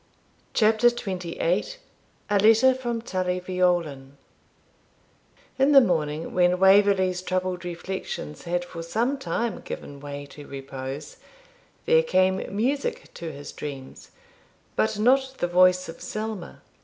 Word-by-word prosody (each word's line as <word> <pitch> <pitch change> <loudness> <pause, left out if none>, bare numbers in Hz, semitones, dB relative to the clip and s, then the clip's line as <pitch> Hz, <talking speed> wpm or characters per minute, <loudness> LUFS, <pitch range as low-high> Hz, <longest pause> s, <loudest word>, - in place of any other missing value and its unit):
CHAPTER 220 +1 +4
XXVIII 185 - -2 0.6
A 205 - +4
LETTER 225 +5 +6
FROM 240 -3 -4
TULLY 185 -4 -1
VEOLAN 175 -7 -1 1.4
In 275 +2 +4
the 275 - +10
morning, 160 - 0
when 180 0 +3
Waverley's 190 -1 +4
troubled 185 -1 -2
reflections 175 - -6
had 175 +1 -1
for 170 -1 -8
some 235 +11 -1
time 235 -3 -2
given 140 -1 -7
way 145 0 -7
to 145 0 -11
repose, 135 +1 -7 0.7
there 480 +1 +5
came 190 - +2 0.2
music 265 +7 -1
to 165 -1 -6
his 145 0 -9
dreams, 135 -3 -8 0.7
but 220 -1 +1
not 265 +4 +3
the - - 0
voice 185 +1 +4
of 165 - -10
Selma. 215 -4 -6
185 Hz, 120 wpm, -25 LUFS, 165-220 Hz, 1.4 s, the